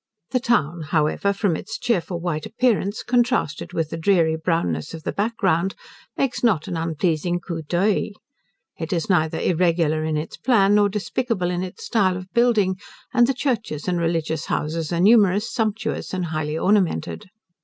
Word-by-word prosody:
The 255 - +2
town, 175 - +1
however, 155 +5 +1
from 200 -4 0
its 220 +7 -6
cheerful 180 -7 -1
white 160 -3 -3
appearance, 225 -4 0
contrasted 240 - 0
with 165 -3 -2
the 165 - -3
dreary 165 -2 +3
brownness 160 - -1
of 160 - -10
the - - -2
back 225 +3 -2
ground, 190 -1 +1 0.4
makes 270 -2 -1
not 200 -10 +2
an - - -3
unpleasing 165 +1 0
coup 170 -2 -5
d'oeil. 180 +6 +1 0.7
It 160 0 -4
is 170 +2 -1
neither 160 -3 +1
irregular 165 -3 +1
in 155 -1 -1
its 150 - -5
plan, 205 -6 +3
nor 205 -1 +4
despicable 210 -2 -1
in 175 0 -2
its 185 -1 -7
style 190 -6 +2
of 185 0 -10
building; 220 -6 +3 0.4
and 240 -2 +5
the 270 - 0
churches 235 - -2
and 180 -1 0
religious 165 -2 -1
houses 160 +1 -2
are 170 - 0
numerous, 205 +1 +4
sumptuous, 220 -4 -2
and 180 -1 -1
highly 155 -1 -2
ornamented. 175 - 0
180 Hz, 165 wpm, -22 LUFS, 160-210 Hz, 0.7 s, and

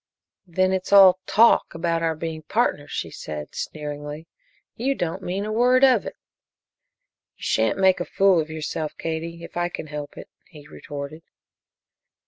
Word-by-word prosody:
"Then 185 +2 +1
it's 185 0 -3
all 190 -2 +8
'talk' 230 -3 +4
about 165 0 -1
our 165 -1 0
being 160 0 -5
partners," - - -1
she - - -4
said, 75 -1 -7
sneeringly. 150 +1 -6 0.5
"You 270 +4 -1
don't 165 -7 -3
mean 190 +3 -3
a 215 - -3
word 250 +4 +3
of 255 -6 +5
it." - - -7 1.2
"You - - -14
shan't 110 0 +1
make 190 -1 +4
a 175 - -2
fool 195 -3 +3
of 155 - -7
yourself, 155 0 -4
Katie, 165 +1 -5
if - - -11
I 175 0 0
can 165 - -6
help 150 -1 -7
it," - - -9 0.2
he 150 -3 -14
retorted. 145 +1 -8
165 Hz, 160 wpm, -23 LUFS, 155-190 Hz, 1.2 s, all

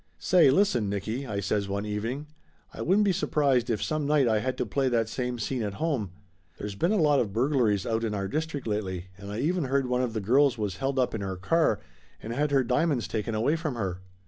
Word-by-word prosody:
"Say, 175 -6 +5
listen, 130 - +2
Nicky," 110 +7 -3
I 100 -3 -2
says 100 0 -1
one 100 +1 -2
evening. 115 +7 -3 0.5
"I - - -7
wouldn't 200 +5 +3
be 200 - +3
surprised 140 -8 +1
if 110 -3 0
some 155 -2 -1
night 145 -3 +3
I 110 -2 +3
had 130 +4 -2
to - - -1
play 135 -2 0
that 115 -2 +1
same 125 +1 -3
scene 120 +2 -2
at 100 -2 -3
home. 135 - -1 0.5
There's 105 0 -5
been 170 - 0
a 215 - +2
lot 150 -5 +4
of 110 -5 -1
burglaries 115 -5 +2
out 115 0 -1
in 110 -2 -1
our 100 -1 -2
district 155 +1 -3
lately, 95 -4 -3
and 100 +1 -9
I 105 - -4
even 170 +1 0
heard 135 +1 +1
one 125 0 0
of 125 -3 -1
the 110 - -1
girls 125 +5 +3
was 105 -4 -3
held 135 0 -2
up 130 -1 +1
in 110 - -3
her 95 -1 -3
car 110 - +2 0.4
and 115 - -6
had 145 +4 0
her 140 -2 +3
diamonds 130 +1 +1
taken 110 0 -2
away 120 +9 +2
from 155 -5 -3
her!" 95 -5 -3
120 Hz, 235 wpm, -27 LUFS, 105-145 Hz, 0.5 s, Say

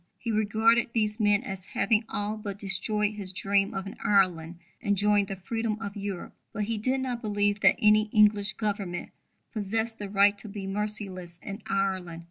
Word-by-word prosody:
He 230 - -3
regarded 220 +3 +3
these 215 -1 0
men 205 +1 +3
as 195 -6 -5
having 225 0 +2
all 205 +1 -2
but 205 -2 -6
destroyed 205 +1 +1
his 200 -3 -6
dream 195 +1 +1
of 195 0 -3
an 195 - -8
Ireland 175 -4 +2 0.2
enjoying 205 0 +2
the 195 - -4
freedom 220 +3 -2
of 215 -2 -6
Europe. 200 -3 -5 0.2
But 210 - -2
he 220 +1 -2
did 260 +4 0
not 250 -2 -3
believe 205 -1 0
that 195 0 +5
any 215 0 +4
English 210 -1 +4
Government 200 -5 -3 0.4
possessed 225 +1 -2
the 205 -1 -5
right 200 +1 +5
to 215 - -8
be 200 -1 -6
merciless 195 -4 -3
in 200 +2 -6
Ireland. 190 -4 -1
205 Hz, 175 wpm, -28 LUFS, 195-215 Hz, 0.4 s, that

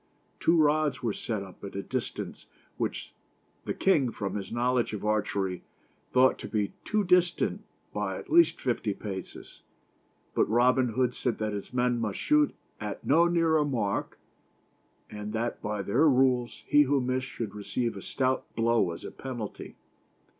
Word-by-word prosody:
Two 165 +1 +3
rods 150 -4 +2
were 115 -3 0
set 110 -2 -3
up 95 -2 -14
at 100 - -7
a 100 - -3
distance - - -5 0.3
which - - -3 0.5
the - - -1
king, 150 -10 +3
from 100 -4 -4
his 100 -2 -5
knowledge 120 0 +1
of 105 - -4
archery, 100 -3 0 0.5
thought 130 +1 +4
to - - -6
be 105 -2 -1
too 210 -1 +1
distant 180 -1 +2 0.3
by - - -2
at - - -10
least 340 0 +5
fifty 115 -5 -1
paces. 95 -3 -8 0.7
But - - +2
Robin 125 +2 +4
Hood 125 0 +1
said 125 - -1
that 110 -1 -2
his 100 - -6
men 125 -1 +1
must 105 -3 -2
shoot 300 -1 +3 0.2
at 105 -1 -5
no 165 +5 +5
nearer 165 -3 +3
mark, 115 -9 -1 0.9
and 105 0 -6
that 115 +1 -2
by 105 -2 -2
their 130 +11 +4
rules, 125 -2 +2
he 145 - +5
who 140 0 +3
missed 130 +1 -1
should 110 -4 -5
receive 115 +3 -2
a 100 - -7
stout 130 +4 -1
blow 115 -4 +2
as - - -9
a - - -6
penalty. 120 -6 -7
120 Hz, 160 wpm, -28 LUFS, 105-135 Hz, 0.9 s, least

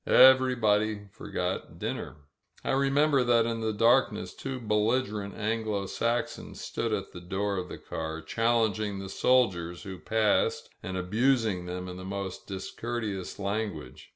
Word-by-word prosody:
Everybody 110 -6 +5
forgot - - -4
dinner. - - -4 0.5
I - - 0
remember 140 +1 +3
that 120 -2 +4
in 115 -1 -2
the 110 0 0
darkness 115 +5 +3
two 135 -1 -5
belligerent 105 -2 0
Anglo 110 -2 -1
Saxons 115 +4 -2
stood 115 - -3
at 100 -2 -2
the 90 - -9
door 100 +3 -1
of 90 0 -4
the - - -6
car, 80 0 -5
challenging 110 0 +1
the 95 0 -6
soldiers 90 -9 +2
who 95 -3 -7
passed 110 +5 +1
and 95 +1 -4
abusing 110 -1 +1
them 90 +1 -4
in 90 0 -7
the 95 - -8
most 95 -1 -5
discourteous 100 0 -4
language. 100 +1 -4
105 Hz, 140 wpm, -29 LUFS, 95-120 Hz, 0.5 s, Everybody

